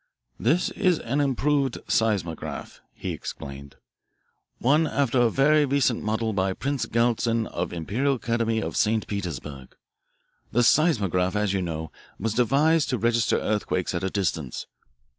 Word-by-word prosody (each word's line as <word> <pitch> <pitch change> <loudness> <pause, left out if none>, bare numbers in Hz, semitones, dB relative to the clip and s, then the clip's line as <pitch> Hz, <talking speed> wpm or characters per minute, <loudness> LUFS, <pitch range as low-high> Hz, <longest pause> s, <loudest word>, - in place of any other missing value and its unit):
"This 160 +10 +2
is 185 -5 +2
an 140 +4 -1
improved 140 -1 +1
seismograph," 100 -8 -1
he - - -5
explained, 70 0 -8 0.8
"one 150 +6 +3
after 135 -4 +1
a 120 - +4
very 150 +5 +4
recent 135 -3 +1
model 110 +1 -1
by 95 -1 0
Prince 140 +5 -2
Galitzin 115 -1 +1
of 85 -4 -3
the - - -7
Imperial 120 - 0
Academy 115 -2 -1
of - - -4
St. 110 0 +1
Petersburg. 75 -9 -6 0.8
The 120 +2 +3
seismograph, 100 - +3
as 105 -2 +1
you 95 - 0
know, 80 -2 -4 0.3
was 110 -2 -1
devised 140 +7 +3
to 125 - 0
register 115 0 +2
earthquakes 105 -4 -1
at 85 - -2
a 95 - 0
distance. 80 -9 -2
115 Hz, 140 wpm, -25 LUFS, 95-135 Hz, 0.8 s, a